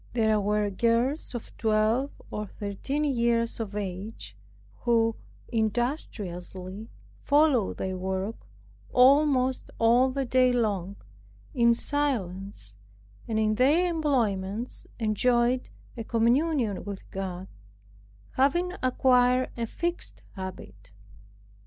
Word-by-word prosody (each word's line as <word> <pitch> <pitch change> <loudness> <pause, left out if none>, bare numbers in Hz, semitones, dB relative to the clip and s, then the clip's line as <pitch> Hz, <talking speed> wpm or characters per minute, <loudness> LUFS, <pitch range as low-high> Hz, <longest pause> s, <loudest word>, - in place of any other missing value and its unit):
There 220 -3 +2
were 210 0 0
girls 235 - +1
of 235 - -7
twelve 220 +5 +2 0.2
or 210 0 -4
thirteen 210 +10 -3
years 235 -5 +1
of 210 -3 -4
age, 200 +2 -5 0.4
who 230 -1 +2 0.3
industriously 210 - -3 0.3
followed 290 -7 +3
their 190 0 -3
work 190 +3 -4 0.4
almost 260 0 +4
all 240 +3 +4
the 270 +1 -2
day 255 0 +3
long, 200 -6 -1 0.6
in 235 -1 +4
silence, 195 - -2 0.5
and 220 - -1
in 215 0 +2
their 285 +10 +4
employments 240 - -1
enjoyed 240 +3 +1 0.3
a 230 - -5
communion 235 - +1
with 200 -2 -7
God, 190 -1 -5 0.8
having 345 +7 +1
acquired 255 0 +3
a 235 -1 -3
fixed 345 +8 -4
habit. 105 - -9
230 Hz, 100 wpm, -27 LUFS, 200-255 Hz, 0.8 s, almost